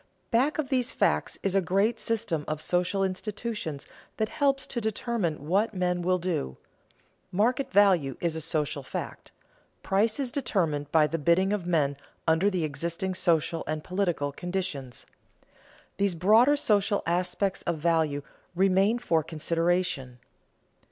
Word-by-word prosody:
Back 255 Hz, +6 st, +2 dB
of 300 Hz, -4 st, -2 dB
these 255 Hz, -2 st, +1 dB
facts -, -, 0 dB
is 195 Hz, -, 0 dB
a 195 Hz, -, +3 dB
great 195 Hz, +6 st, +1 dB
system 215 Hz, -10 st, -1 dB
of 155 Hz, 0 st, -2 dB
social 180 Hz, +4 st, 0 dB
institutions 195 Hz, -5 st, -4 dB, 0.3 s
that 220 Hz, -1 st, 0 dB
helps 275 Hz, -1 st, +1 dB
to 240 Hz, -, -4 dB
determine 215 Hz, -, -2 dB
what 205 Hz, +5 st, +1 dB
men 180 Hz, -1 st, 0 dB
will 185 Hz, +1 st, +2 dB
do. 170 Hz, -, -3 dB, 0.7 s
Market 250 Hz, +8 st, +1 dB
value 180 Hz, -10 st, +4 dB
is 170 Hz, -2 st, -1 dB
a 160 Hz, -, -3 dB
social 155 Hz, -2 st, -1 dB
fact; 130 Hz, -, -7 dB, 0.5 s
price 215 Hz, +6 st, +1 dB
is 265 Hz, -3 st, -2 dB
determined 160 Hz, -, -1 dB
by 160 Hz, -2 st, +5 dB
the 165 Hz, +2 st, -2 dB
bidding 180 Hz, +6 st, +3 dB
of 190 Hz, -4 st, -3 dB
men 145 Hz, -5 st, +1 dB, 0.3 s
under 165 Hz, +5 st, +4 dB
the 185 Hz, -4 st, -1 dB
existing 170 Hz, +5 st, -2 dB
social 165 Hz, -2 st, +1 dB
and 155 Hz, 0 st, -3 dB
political 180 Hz, -6 st, -1 dB
conditions. 175 Hz, -6 st, -5 dB, 0.9 s
These 200 Hz, -3 st, +1 dB
broader 220 Hz, -, +5 dB
social 205 Hz, -6 st, +2 dB
aspects 180 Hz, +3 st, 0 dB
of 170 Hz, -2 st, -2 dB
value 155 Hz, -3 st, +1 dB, 0.3 s
remain 195 Hz, +4 st, +3 dB
for 170 Hz, -10 st, +1 dB
consideration. 165 Hz, -4 st, -1 dB
180 Hz, 140 wpm, -27 LUFS, 160-210 Hz, 0.9 s, by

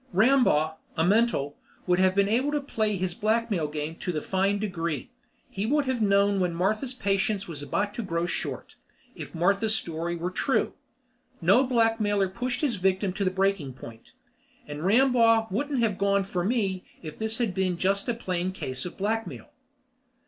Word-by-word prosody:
Rambaugh, 190 Hz, -, +3 dB, 0.2 s
a 160 Hz, -, +3 dB
mental, 200 Hz, -8 st, +2 dB, 0.3 s
would 180 Hz, 0 st, +2 dB
have 185 Hz, 0 st, +3 dB
been 200 Hz, 0 st, +3 dB
able 250 Hz, +7 st, +1 dB
to 295 Hz, -, +2 dB
play 220 Hz, -7 st, -1 dB
his 185 Hz, -1 st, -2 dB
blackmail 215 Hz, -5 st, 0 dB
game 150 Hz, +1 st, -4 dB
to 180 Hz, -, -3 dB
the 155 Hz, -, -2 dB
fine 195 Hz, +5 st, 0 dB
degree; 170 Hz, -, -3 dB, 0.4 s
he 200 Hz, +2 st, -3 dB
would 290 Hz, +2 st, +2 dB
have 260 Hz, -3 st, -1 dB
known 200 Hz, -1 st, +3 dB
when 180 Hz, -2 st, 0 dB
Martha's 215 Hz, +9 st, -1 dB
patience 200 Hz, -2 st, 0 dB
was 155 Hz, -4 st, -5 dB
about 205 Hz, +8 st, -1 dB
to 235 Hz, -, -4 dB
grow 170 Hz, -4 st, -1 dB
short 175 Hz, -, -4 dB, 0.4 s
if -, -, -9 dB
Martha's 200 Hz, +6 st, +2 dB
story 170 Hz, -3 st, -3 dB
were 175 Hz, +2 st, -3 dB
true. -, -, 0 dB, 0.7 s
No 260 Hz, -, +5 dB
blackmailer 225 Hz, -5 st, +2 dB
pushed 245 Hz, +5 st, -3 dB
his 265 Hz, -8 st, 0 dB
victim 190 Hz, +1 st, +1 dB
to 200 Hz, -, -2 dB
the 185 Hz, -, +2 dB
breaking 190 Hz, -7 st, 0 dB
point. 115 Hz, -2 st, -12 dB, 0.5 s
And 150 Hz, +1 st, -7 dB
Rambaugh 230 Hz, +1 st, +4 dB
wouldn't 270 Hz, +4 st, 0 dB
have 210 Hz, -4 st, 0 dB
gone 200 Hz, 0 st, +2 dB
for 185 Hz, -2 st, -3 dB
me 195 Hz, -4 st, 0 dB, 0.2 s
if 155 Hz, -2 st, -8 dB
this 220 Hz, 0 st, -2 dB
had 225 Hz, -7 st, -1 dB, 0.2 s
just 195 Hz, +2 st, 0 dB
been 240 Hz, -, 0 dB
a -, -, -13 dB
plain 185 Hz, -4 st, -2 dB
case 130 Hz, -3 st, -5 dB
of -, -, -10 dB
blackmail. 220 Hz, +3 st, -3 dB
200 Hz, 175 wpm, -27 LUFS, 180-225 Hz, 0.7 s, No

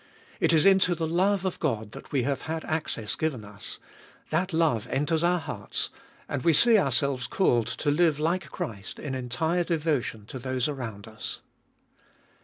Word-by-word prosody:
It -, -, +3 dB
is 160 Hz, -2 st, +5 dB
into 190 Hz, -2 st, +5 dB
the 165 Hz, 0 st, -1 dB
love 185 Hz, +4 st, +2 dB
of 185 Hz, -, -2 dB
God 110 Hz, -8 st, -1 dB
that -, -, -11 dB
we 135 Hz, -4 st, +1 dB
have 140 Hz, +1 st, -1 dB
had 160 Hz, 0 st, -3 dB
access 150 Hz, -9 st, -2 dB
given 140 Hz, -9 st, -2 dB
us; 100 Hz, -1 st, -6 dB, 0.5 s
that 180 Hz, +5 st, +1 dB
love 160 Hz, -10 st, +1 dB
enters 150 Hz, +4 st, 0 dB
our 175 Hz, +1 st, +3 dB
hearts; 145 Hz, -, -4 dB, 0.4 s
and -, -, -2 dB
we 165 Hz, -, +4 dB
see 235 Hz, +9 st, +6 dB
ourselves 135 Hz, -4 st, +1 dB
called 120 Hz, -, +2 dB
to 130 Hz, +5 st, -1 dB
live 160 Hz, -1 st, +3 dB
like 170 Hz, +5 st, 0 dB
Christ 105 Hz, -, -6 dB
in 145 Hz, -3 st, -5 dB
entire 145 Hz, +8 st, 0 dB
devotion 150 Hz, -, -1 dB
to 130 Hz, -, -7 dB
those 130 Hz, 0 st, -1 dB
around 115 Hz, -8 st, -5 dB
us. 110 Hz, 0 st, -6 dB
150 Hz, 170 wpm, -27 LUFS, 120-170 Hz, 0.5 s, see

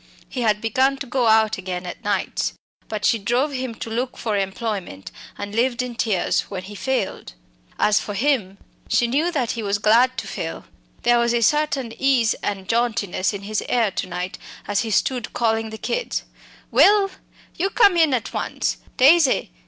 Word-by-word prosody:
He 255 Hz, -, -5 dB
had 210 Hz, -2 st, +2 dB
begun 260 Hz, +5 st, +2 dB
to 280 Hz, -, -5 dB
go 250 Hz, -1 st, 0 dB
out 220 Hz, -1 st, +4 dB
again 180 Hz, -1 st, -5 dB
at 175 Hz, -, -8 dB
nights. 205 Hz, 0 st, -1 dB, 0.4 s
But 210 Hz, -1 st, -3 dB
she 230 Hz, -, +3 dB
drove 245 Hz, +8 st, 0 dB
him 255 Hz, -3 st, -4 dB
to 225 Hz, -, -6 dB
look 245 Hz, +3 st, -2 dB
for 220 Hz, -3 st, -2 dB
employment, 195 Hz, -, -3 dB, 0.3 s
and 205 Hz, 0 st, -6 dB
lived 240 Hz, +2 st, +1 dB
in 250 Hz, -1 st, -5 dB
tears 220 Hz, -5 st, 0 dB
when 185 Hz, -2 st, -5 dB
he 205 Hz, +2 st, -9 dB
failed. 250 Hz, -, -3 dB, 0.4 s
As 210 Hz, 0 st, +3 dB
for 205 Hz, -, -6 dB
him, 215 Hz, -5 st, 0 dB, 0.3 s
she 240 Hz, -, +3 dB
knew 295 Hz, +9 st, +1 dB
that 265 Hz, -8 st, -1 dB
he 230 Hz, -, -4 dB
was 200 Hz, -1 st, 0 dB
glad 235 Hz, +5 st, +4 dB
to -, -, -3 dB
fail; -, -, -5 dB, 0.4 s
there 240 Hz, 0 st, +4 dB
was 235 Hz, 0 st, +2 dB
a 235 Hz, -, +2 dB
certain 280 Hz, -2 st, +1 dB
ease 255 Hz, -4 st, +3 dB
and 195 Hz, -2 st, -3 dB
jauntiness 225 Hz, -5 st, 0 dB
in 200 Hz, -2 st, -7 dB
his 215 Hz, +1 st, -2 dB
air 230 Hz, -5 st, +2 dB
to 185 Hz, +1 st, -3 dB
night 180 Hz, +1 st, -5 dB, 0.3 s
as 205 Hz, -1 st, +1 dB
he 225 Hz, -, -2 dB
stood 245 Hz, +2 st, 0 dB
calling 225 Hz, -1 st, 0 dB
the 220 Hz, -, -7 dB
children: 485 Hz, -, -3 dB, 0.4 s
"Will! 400 Hz, -1 st, +5 dB, 0.4 s
you 380 Hz, +3 st, 0 dB
come 405 Hz, -4 st, +5 dB
in 320 Hz, -5 st, +4 dB
at 225 Hz, -5 st, -4 dB
once! -, -, -2 dB, 0.2 s
Daisy! 280 Hz, -, +5 dB
230 Hz, 185 wpm, -22 LUFS, 205-260 Hz, 0.4 s, Will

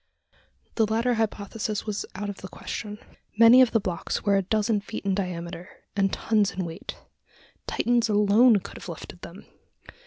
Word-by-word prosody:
The 220 Hz, -2 st, +3 dB
latter 230 Hz, +3 st, +1 dB
hypothesis 215 Hz, -1 st, -2 dB
was 210 Hz, -2 st, -3 dB
out 205 Hz, +2 st, -4 dB
of 200 Hz, -1 st, -5 dB
the 190 Hz, -, -8 dB
question. 210 Hz, +2 st, -6 dB, 0.4 s
Many 230 Hz, +3 st, +8 dB
of 255 Hz, -, +5 dB
the 225 Hz, -, +2 dB
blocks 180 Hz, -4 st, -3 dB
were 200 Hz, -1 st, +3 dB
a 195 Hz, -, +3 dB
dozen 210 Hz, +2 st, 0 dB
feet 200 Hz, -, -7 dB
in 195 Hz, -, +1 dB
diameter, 180 Hz, -2 st, -4 dB, 0.3 s
and 195 Hz, -1 st, +2 dB
tons 210 Hz, -3 st, +1 dB
in 185 Hz, -1 st, -3 dB
weight. 165 Hz, -1 st, -7 dB, 0.7 s
Titans 240 Hz, -2 st, +1 dB
alone 210 Hz, +2 st, +5 dB
could -, -, -10 dB
have -, -, -9 dB
lifted -, -, -9 dB
them! -, -, -11 dB
205 Hz, 165 wpm, -26 LUFS, 195-225 Hz, 0.7 s, Many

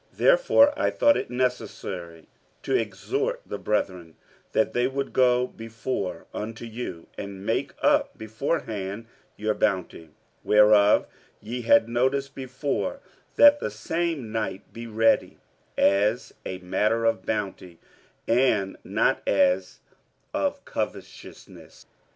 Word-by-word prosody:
47:009:005 -, -, -28 dB
Therefore 400 Hz, -, +4 dB
I -, -, +2 dB
thought 290 Hz, 0 st, +4 dB
it -, -, -4 dB
necessary 105 Hz, -9 st, -3 dB, 0.4 s
to -, -, 0 dB
exhort 420 Hz, -, -1 dB
the -, -, -5 dB
brethren, 90 Hz, -6 st, -2 dB, 0.4 s
that 110 Hz, -, +1 dB
they 120 Hz, +1 st, +2 dB
would 135 Hz, +1 st, -4 dB
go 125 Hz, -1 st, +4 dB
before 110 Hz, -7 st, -5 dB
unto 110 Hz, +2 st, -6 dB
you, 110 Hz, -7 st, -6 dB
and 100 Hz, -1 st, -7 dB
make -, -, -1 dB
up -, -, +2 dB
beforehand 110 Hz, -3 st, -3 dB, 0.3 s
your 105 Hz, 0 st, 0 dB
bounty, 90 Hz, -5 st, -2 dB, 0.3 s
whereof 105 Hz, -1 st, +5 dB, 0.3 s
ye 120 Hz, +4 st, -5 dB
had 120 Hz, +1 st, +4 dB
notice 130 Hz, +4 st, 0 dB
before, 135 Hz, -, -3 dB, 0.4 s
that 290 Hz, 0 st, +7 dB
the -, -, -2 dB
same 165 Hz, -9 st, -3 dB
might 110 Hz, -3 st, -4 dB
be 115 Hz, 0 st, -7 dB
ready, 115 Hz, 0 st, +2 dB, 0.4 s
as 105 Hz, +5 st, +2 dB
a 95 Hz, -, -4 dB
matter 105 Hz, +5 st, 0 dB
of 115 Hz, -5 st, +1 dB
bounty, 95 Hz, -5 st, -4 dB, 0.5 s
and 115 Hz, -5 st, +2 dB
not -, -, +1 dB
as 90 Hz, +1 st, +2 dB, 0.5 s
of -, -, -2 dB
covetousness. -, -, -7 dB
115 Hz, 120 wpm, -25 LUFS, 100-130 Hz, 0.5 s, that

